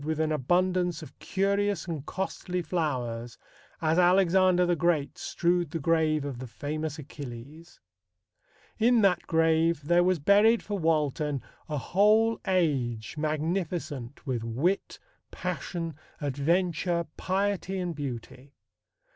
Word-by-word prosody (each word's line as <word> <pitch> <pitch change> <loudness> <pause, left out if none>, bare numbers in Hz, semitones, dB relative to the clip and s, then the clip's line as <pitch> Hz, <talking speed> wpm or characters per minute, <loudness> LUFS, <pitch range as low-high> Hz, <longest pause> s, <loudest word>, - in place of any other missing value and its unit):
with 155 +1 -2
an 160 0 +1
abundance 175 +3 +1
of - - -13
curious 200 0 0
and 155 -5 -5
costly 185 -1 -3
flowers," 125 -9 -2 0.5
as 160 +2 +3
Alexander 180 0 +4
the 175 0 +2
Great 165 -4 +1
strewed 175 -1 0
the 165 - -3
grave 155 -1 +1
of 135 -4 -5
"the 130 - -6
famous 155 +4 -4
Achilles." 145 +3 -10 1.0
In 235 +1 +4
that 185 -4 +2
grave 160 -1 +2
there 175 +4 +4
was 185 0 +2
buried 205 +9 +4
for 205 -2 -3
Walton 150 -3 0 0.3
a 150 - -2
whole 215 - +3
age 135 - 0
magnificent 155 -4 -3
with 125 -5 -2
wit, 140 +12 -1 0.3
passion, 170 -1 -4 0.3
adventure, 170 +4 0
piety 195 0 -1
and 180 -2 -2
beauty. 135 -1 -7
165 Hz, 120 wpm, -28 LUFS, 145-180 Hz, 1.0 s, Alexander